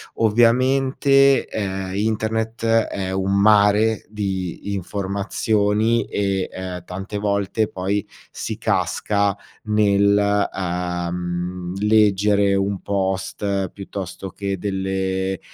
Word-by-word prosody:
Ovviamente, 130 Hz, +4 st, +3 dB
ehm, 95 Hz, -3 st, -3 dB
internet 110 Hz, +2 st, -1 dB
è 110 Hz, -4 st, +1 dB
un 95 Hz, +1 st, 0 dB
mare 105 Hz, +1 st, +4 dB
di 100 Hz, -2 st, -4 dB
informazioni 105 Hz, +3 st, 0 dB
e, 100 Hz, -2 st, -1 dB
ehm, 90 Hz, -1 st, -6 dB
tante 95 Hz, +3 st, -5 dB
volte 100 Hz, +1 st, 0 dB
poi 100 Hz, +2 st, -2 dB, 0.3 s
si -, -, -5 dB
casca, 100 Hz, -1 st, 0 dB, 0.3 s
nel, 100 Hz, -1 st, +3 dB
ehm, 90 Hz, 0 st, -3 dB
leggere 105 Hz, -1 st, +3 dB
un 100 Hz, 0 st, -1 dB
post 95 Hz, 0 st, -2 dB
piuttosto 95 Hz, -1 st, -7 dB
che 100 Hz, -1 st, -3 dB
delle, 95 Hz, -1 st, -2 dB
100 Hz, 90 wpm, -21 LUFS, 95-105 Hz, 0.3 s, mare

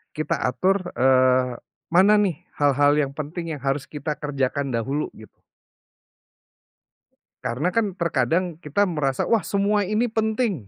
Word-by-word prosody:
Kita 155 Hz, -, -1 dB
atur, 185 Hz, +8 st, 0 dB
eee, 130 Hz, -1 st, +3 dB, 0.4 s
mana 190 Hz, +4 st, +6 dB
nih 190 Hz, -7 st, 0 dB, 0.2 s
hal-hal 145 Hz, 0 st, +3 dB
yang 140 Hz, -2 st, 0 dB
penting 160 Hz, +3 st, -5 dB
yang 145 Hz, -, -8 dB
harus 135 Hz, 0 st, -1 dB
kita 150 Hz, 0 st, -5 dB
kerjakan 140 Hz, -2 st, -2 dB
dahulu, 135 Hz, +6 st, -1 dB
gitu. 110 Hz, -, -16 dB, 2.0 s
Karena 125 Hz, +9 st, -1 dB
kan 205 Hz, -3 st, 0 dB
terkadang 170 Hz, -1 st, 0 dB
kita 160 Hz, +5 st, 0 dB
merasa, 150 Hz, -8 st, 0 dB
wah, 230 Hz, -, +2 dB
semua 200 Hz, 0 st, +1 dB
ini 220 Hz, +2 st, 0 dB
penting. 220 Hz, -, -1 dB
150 Hz, 130 wpm, -23 LUFS, 135-195 Hz, 2.0 s, mana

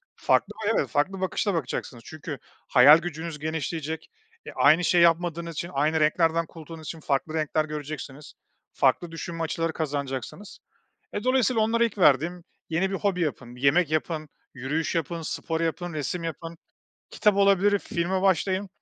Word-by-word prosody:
farklı, 205 Hz, +2 st, +1 dB, 0.2 s
evet, 140 Hz, -, +1 dB
farklı 185 Hz, -, 0 dB
bakışla 195 Hz, +2 st, 0 dB
bakacaksınız 125 Hz, -5 st, -4 dB
çünkü 155 Hz, -2 st, -7 dB, 0.3 s
hayal 140 Hz, +4 st, +8 dB
gücünüz 165 Hz, -2 st, -6 dB
genişleyecek, 160 Hz, +1 st, -4 dB, 0.4 s
e, -, -, -7 dB
aynı 165 Hz, +3 st, +5 dB
şey 175 Hz, 0 st, +4 dB
yapmadığınız 170 Hz, 0 st, +2 dB
için 170 Hz, +3 st, -4 dB
aynı 155 Hz, +3 st, +1 dB
renklerden 165 Hz, +2 st, +2 dB
kurtulduğunuz 160 Hz, 0 st, -11 dB
için 165 Hz, -, -6 dB
farklı 145 Hz, +2 st, -1 dB
renkler 155 Hz, 0 st, 0 dB
göreceksiniz, 150 Hz, -1 st, -7 dB, 0.4 s
farklı 175 Hz, -2 st, +1 dB
düşünme 165 Hz, 0 st, -5 dB
açıları 165 Hz, 0 st, -2 dB
kazanacaksınız. 145 Hz, -, -5 dB, 0.5 s
E, 205 Hz, -, -4 dB
dolayısıyla 255 Hz, -3 st, +2 dB
onlara 230 Hz, +2 st, +2 dB
ilk 220 Hz, -3 st, -3 dB
verdiğim 170 Hz, +3 st, +3 dB, 0.3 s
yeni 185 Hz, +4 st, +1 dB
bir 195 Hz, -, -1 dB
hobi 190 Hz, -3 st, -1 dB
yapın, 130 Hz, -6 st, -3 dB
yemek 140 Hz, +5 st, +3 dB
yapın, 155 Hz, 0 st, -2 dB, 0.3 s
yürüyüş 145 Hz, +7 st, -2 dB
yapın, 165 Hz, +1 st, -2 dB
spor 160 Hz, +1 st, -3 dB
yapın, 170 Hz, +1 st, -2 dB
resim 160 Hz, +3 st, -3 dB
yapın, 165 Hz, +1 st, -6 dB, 0.5 s
kitap 210 Hz, -2 st, +2 dB
olabilir 200 Hz, 0 st, +4 dB
filme 185 Hz, +1 st, -2 dB
başlayın 190 Hz, +1 st, +1 dB
165 Hz, 145 wpm, -26 LUFS, 150-180 Hz, 0.5 s, hayal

